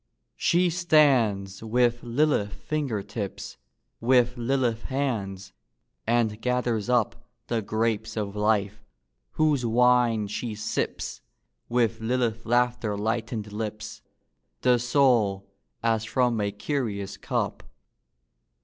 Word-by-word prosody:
She 175 0 +3
stands 130 - +3
with 120 +1 +1
Lilith 120 -4 +1
finger 135 -7 -2
tips, 100 - -6 0.4
With 125 0 +3
Lilith 120 -2 0
hands; 110 -9 -3 0.5
and 115 -2 +1
gathers 125 -3 0
up 120 -1 +1 0.3
The 115 -2 0
grapes 110 +1 -1
of 105 -1 -3
life; 105 -1 0 0.5
whose 150 -4 +2
wine 120 -2 +3
she 105 +2 -4
sips, 105 +1 -3 0.5
With 115 -2 +1
Lilith 115 -1 -1
laughter 120 -3 +1
lightened 110 0 -2
lips, 110 0 -5 0.6
The 125 -1 +4
soul, 120 -6 +2 0.4
as 115 -2 +2
from 120 -1 +1
a 100 0 0
curious 105 -3 -3
cup. - - -2
115 Hz, 105 wpm, -26 LUFS, 105-125 Hz, 0.6 s, The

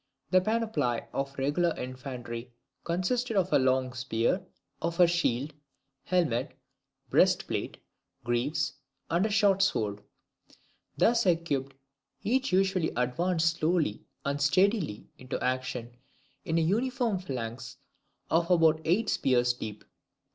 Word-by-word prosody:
The 185 0 +5
panoply 200 - 0
of 135 0 -2
the 135 - -3
regular 165 +4 +1
infantry 125 -2 -6 0.3
consisted 215 +7 -1
of 185 -1 +1
a - - +6
long 130 -1 +1
spear, 120 - 0 0.4
of 170 +1 -2
a 175 - +9
shield, 155 -5 0 0.5
helmet, 155 -10 0 0.5
breast - - +4
plate, - - -3 0.5
greaves, 140 +6 0 0.4
and 185 +6 +2
short 195 -2 +4
sword. 105 - 0 1.0
Thus 230 -2 +3
equipped, 145 -6 0 0.5
they 255 +5 +2
usually 190 -6 +2
advanced 165 +7 +1
slowly 155 - +1 0.2
and 140 +1 -1
steadily 185 - +2
into 130 -1 -4
action 125 -2 -2 0.5
in 160 - 0
an 160 -1 +2
uniform 235 0 0
phalanx 125 -5 -6 0.5
of 170 +2 +2
about 165 -3 +4
eight 185 +8 +2
spears 125 -6 +2
deep. 110 -3 -7
160 Hz, 120 wpm, -29 LUFS, 125-185 Hz, 1.0 s, a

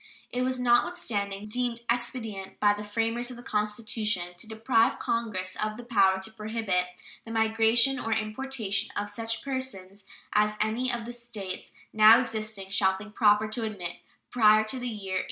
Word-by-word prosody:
It 250 - -1
was, 255 0 0
notwithstanding, 235 - 0
deemed 240 +1 -1
expedient 225 -5 -3
by 205 -1 +5
the 205 0 -6
framers 230 +3 -1
of 250 - -8
the 240 - -11
Constitution 210 -4 -1
to 195 - -4
deprive 225 +1 +2
Congress 205 -6 -2
of 215 0 -2
the 245 - -8
power 200 -5 +4
to 220 - -4
prohibit 215 -4 -1 0.4
"the - - -12
migration 225 +4 +3
or 225 - -3
importation 215 -1 -1
of 205 0 -2
such 225 +1 -3
persons 210 -8 -5 0.3
as 210 0 +2
any 225 +4 0
of 235 -1 -3
the 240 - -6
States 225 -6 -7 0.2
now 220 +2 +8
existing 215 -5 -4
shall 190 -1 +2
think 210 +1 -11
proper 210 -1 +4
to 225 +2 -3
admit" 190 -6 -4 0.3
"prior 215 -3 +6
to 235 +4 -4
the 250 - -4
year 195 -5 -3
1808." - - +2
220 Hz, 170 wpm, -28 LUFS, 205-235 Hz, 0.4 s, now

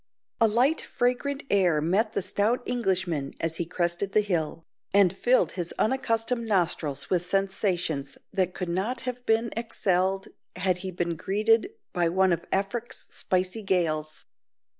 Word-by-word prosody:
A 225 - +6
light 250 +9 +2
fragrant 260 +4 -1
air 180 -6 +4
met 195 +8 +1
the - - 0
stout 225 +7 +1
Englishman 185 - -1
as 160 0 -1
he 170 - -2
crested 175 +2 -1
the 215 - +5
hill, 165 -5 -2 0.3
and 195 -2 +5
filled 245 +6 +3
his 175 -3 -4
unaccustomed 230 -1 0
nostrils 165 -8 0
with 180 -2 +3
sensations 180 -6 -1 0.2
that 185 -2 0
could 180 - -3
not 205 +8 -1
have 250 -1 -5
been 225 +1 +2
excelled 195 -4 0 0.3
had 185 -1 0
he 190 +1 -5
been 170 -2 -2
greeted 215 - +2 0.2
by 175 -2 +2
one 190 +1 +3
of 170 0 -4
"Afric's 200 +5 -2
spicy 185 +4 -1
gales." 155 -6 0
190 Hz, 145 wpm, -27 LUFS, 175-225 Hz, 0.3 s, A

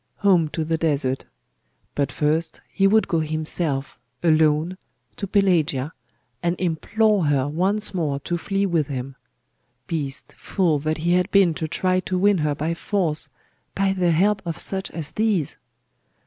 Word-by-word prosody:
Home 180 -5 +5
to 160 +1 -3
the 160 0 -1
desert! 140 -5 0 0.7
But 140 -1 -1
first 160 +2 0
he 195 - +4
would 220 +2 +3
go 170 -4 +1
himself, 155 -2 -2 0.2
alone, 160 +2 +3 0.4
to 200 - -4
Pelagia, 165 -8 +1 0.5
and 170 0 -1
implore 200 +3 +1
her 140 -2 +2
once 190 +8 0
more 150 -6 -1
to 175 - -2
flee 195 +3 -1
with 165 -6 +1
him. 135 -1 -5 0.7
Beast, 145 -5 -3
fool, 170 -7 +1
that 155 +2 -1
he 170 +2 0
had 180 0 +2
been 195 -4 +4
to 160 0 -3
try 185 +3 +1
to 185 +1 -2
win 200 0 +3
her 150 -1 0
by 155 +4 -1
force 170 -5 -1 0.5
by 195 0 +2
the 180 -2 +1
help 195 +5 +2
of 170 -2 -4
such 190 0 0
as 160 -3 -6
these! 210 -9 0
165 Hz, 155 wpm, -23 LUFS, 150-190 Hz, 0.7 s, Home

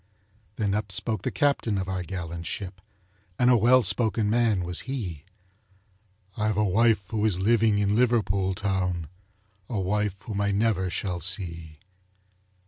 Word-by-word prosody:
Then 100 -2 -1
up 105 -1 -2
spoke 110 +4 -2
the - - -1
captain 140 -8 +1
of 95 -1 -2
our 95 -1 -2
gallant 85 -1 -6
ship, 95 -2 -6 0.6
And 125 0 +4
a - - +6
well 120 +3 +5
spoken 105 +1 +1
man 110 -5 +2
was 90 0 -1
he: 95 - -4 1.1
"I've 110 -1 0
a 105 - +3
wife 105 +1 +3
who 110 -1 -1
is 105 -5 +2
living 110 +1 +3
in 100 0 +1
Liverpool 100 -6 +2
town, 90 -5 -2 0.6
A 110 - -2
wife 105 +1 0
whom 105 -2 -3
I 100 - +1
never 100 -2 +1
shall 90 -1 -3
see." 85 -3 -2
100 Hz, 150 wpm, -26 LUFS, 95-110 Hz, 1.1 s, a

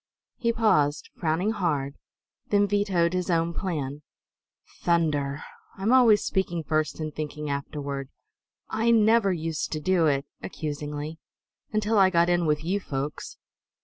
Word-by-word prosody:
He 235 -2 +1
paused, 155 -11 +1
frowning 170 +5 0
hard; 155 -10 -1 0.6
then 205 -1 +4
vetoed 190 -4 +1
his 185 0 -1
own 170 0 +1
plan. 150 -7 -3 0.8
"Thunder; 150 -5 +1 0.3
I'm 205 +6 +1
always 230 -5 +6
speaking 175 -4 -1
first 155 +1 -1
and 155 -1 -4
thinking 150 -1 -4
afterward. 140 -1 -4 0.6
I 225 +2 0
never 225 -2 +4
used 165 -3 -3
to 155 - -2
do 170 +1 +2
it," 140 -1 +1 0.2
accusingly, 150 +1 -5 0.5
"until 215 0 +1
I 190 -1 +6
got 170 -1 +3
in 175 -1 +2
with 150 0 +1
you 190 +5 0
folks. 140 -4 -5
165 Hz, 135 wpm, -26 LUFS, 150-200 Hz, 0.8 s, always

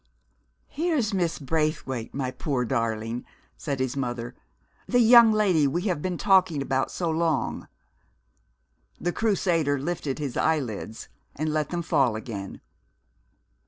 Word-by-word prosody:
"Here's 300 -10 -1
Miss 175 -4 0
Braithwaite, 145 -5 -2
my 130 -2 -3
poor 130 -2 -2
darling," 115 -1 -2 0.3
said 140 -3 -4
his 130 0 -1
mother. 120 -2 -3 0.5
"The 245 - +3
young 235 -1 +8
lady 190 -9 +3
we 170 +6 -1
have 180 -7 -1
been 180 0 -2
talking 185 -6 +3
about 135 -1 0
so 175 - -3
long." 160 -4 -1 1.3
The 175 - -1
Crusader 175 -9 +1
lifted 150 -1 -3
his 145 -5 -4
eyelids 125 -8 -2 0.3
and 155 +1 -2
let 155 -1 0
them 175 -1 -3
fall 130 -7 +2
again. 110 -4 -7
150 Hz, 125 wpm, -26 LUFS, 130-175 Hz, 1.3 s, young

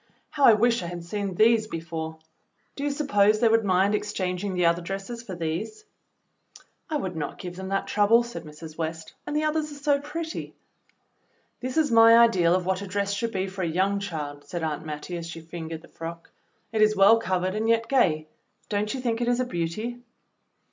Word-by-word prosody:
"How 290 -3 +3
I 230 - +9
wish 230 +2 +3
I 175 - -5
had 175 0 -6
seen 200 +1 -3
these 220 +2 +4
before! 160 -3 -5 0.6
Do 280 - -5
you 290 - +1
suppose 215 -8 +2
they 235 - +4
would 225 0 +4
mind 195 +1 +3
exchanging 190 -2 -2
the 180 -1 +2
other 170 +1 +3
dresses 195 +6 -5
for 195 -6 -7
these.?" 175 - -4 1.0
"I 310 - 0
would 190 - -4
not 155 -2 -4
give 180 -2 -7
them 190 +1 -6
that 195 0 -1
trouble," 215 +3 +4
said 235 0 -7
Mrs. 155 +1 -11
West, 160 0 -4
"and 295 - -3
the 305 - +1
others 305 0 0
are - - -8
so 285 0 +1
pretty." 320 +3 -6 1.0
"This 255 +2 -4
is 310 -5 +3
my 230 0 +8
ideal 185 -8 +5
of 185 -1 -1
what 190 +1 0
a 200 - -6
dress 200 +1 -1
should 230 +3 -2
be 190 -3 -1
for 190 0 -6
a 175 - 0
young 190 +5 +1
child," 150 -7 -5
said 175 -2 -5
Aunt 155 -1 -2
Mattie, 155 +4 -5
as 170 -1 -6
she 165 0 -7
fingered 165 0 -7
the - - -14
frock. 165 0 -8 0.4
"It 220 -1 0
is 215 0 +5
,well 200 +3 +6
covered 185 -3 -1
and 220 +2 -1
yet 230 0 +2
gay. 165 - +2 0.4
Don't 210 0 -1
you 260 - -4
think 235 -2 -1
it 240 - 0
is 245 0 +2
a 255 - +1
beauty.?" 215 +5 -3
200 Hz, 210 wpm, -26 LUFS, 170-230 Hz, 1.0 s, I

